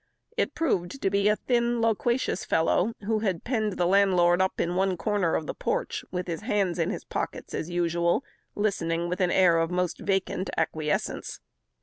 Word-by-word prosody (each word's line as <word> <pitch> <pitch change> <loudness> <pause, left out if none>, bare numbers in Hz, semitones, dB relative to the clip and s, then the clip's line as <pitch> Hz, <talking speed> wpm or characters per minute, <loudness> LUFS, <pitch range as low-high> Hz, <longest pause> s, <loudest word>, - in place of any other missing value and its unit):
It 475 - -1
proved 275 - -1
to 195 - +1
be 200 +1 +2
a 210 - +4
thin, 240 0 0
loquacious 230 0 0
fellow, 180 +6 +1
who 220 0 +1
had 190 -6 -1
penned 220 -5 0
the 180 - 0
landlord 180 -2 +4
up 190 - 0
in 170 - 0
one 190 0 +1
corner 200 -4 0
of 160 - -1
the - - -4
porch, - - -2
with 180 0 -3
his 170 0 -4
hands 200 -6 0
in 165 - +1
his - - -4
pockets - - -5
as 165 - -3
usual, 170 +4 +1 0.3
listening 170 -5 0
with 180 +2 -2
an 180 - +3
air 175 -3 +4
of 165 0 +1
the 180 - -3
most 180 -1 -1
vacant 195 -1 -1
acquiescence. 155 -1 -2
185 Hz, 190 wpm, -27 LUFS, 175-210 Hz, 0.3 s, a